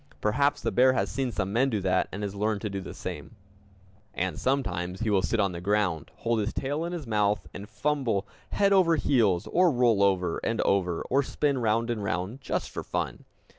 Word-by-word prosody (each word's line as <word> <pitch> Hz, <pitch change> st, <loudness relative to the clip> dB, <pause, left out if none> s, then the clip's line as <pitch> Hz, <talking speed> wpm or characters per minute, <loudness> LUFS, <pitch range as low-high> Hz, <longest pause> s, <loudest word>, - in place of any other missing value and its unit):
Perhaps 140 Hz, +7 st, +1 dB
the -, -, -1 dB
bear 130 Hz, +1 st, +5 dB
has -, -, -1 dB
seen 135 Hz, -2 st, -1 dB
some 95 Hz, -2 st, -2 dB
men 130 Hz, +4 st, +3 dB
do 110 Hz, -5 st, -1 dB
that, 95 Hz, -1 st, +1 dB
and 105 Hz, +2 st, -5 dB
has 100 Hz, -1 st, -3 dB
learned 105 Hz, 0 st, -1 dB
to 105 Hz, -, -3 dB
do 100 Hz, 0 st, -3 dB
the -, -, -8 dB
same! -, -, -7 dB, 0.8 s
And 90 Hz, +1 st, -2 dB
sometimes 95 Hz, -9 st, -1 dB
he 110 Hz, -2 st, 0 dB
will 100 Hz, -2 st, +3 dB
sit 115 Hz, +4 st, -1 dB
on 100 Hz, -2 st, +2 dB
the 85 Hz, -1 st, -6 dB
ground, 95 Hz, -5 st, 0 dB
hold 115 Hz, -1 st, -1 dB
his 105 Hz, +2 st, -1 dB
tail 145 Hz, +4 st, -2 dB
in 170 Hz, -, -4 dB
his 170 Hz, -5 st, -5 dB
mouth, 105 Hz, -5 st, 0 dB
and 100 Hz, +2 st, -8 dB
fumble 115 Hz, -3 st, -1 dB, 0.2 s
head 200 Hz, 0 st, +2 dB
over 180 Hz, -4 st, +5 dB
heels, 110 Hz, -, +2 dB
or 180 Hz, +1 st, +4 dB
roll 120 Hz, -7 st, +3 dB
over 95 Hz, -4 st, +2 dB
and 115 Hz, -, -2 dB
over, 90 Hz, -4 st, +1 dB
or 135 Hz, +2 st, +2 dB
spin 140 Hz, 0 st, 0 dB
round 115 Hz, +1 st, +1 dB
and 110 Hz, -3 st, -3 dB
round 100 Hz, +5 st, -3 dB
just -, -, -3 dB
for -, -, -4 dB
fun! -, -, -4 dB
110 Hz, 210 wpm, -27 LUFS, 100-130 Hz, 0.8 s, bear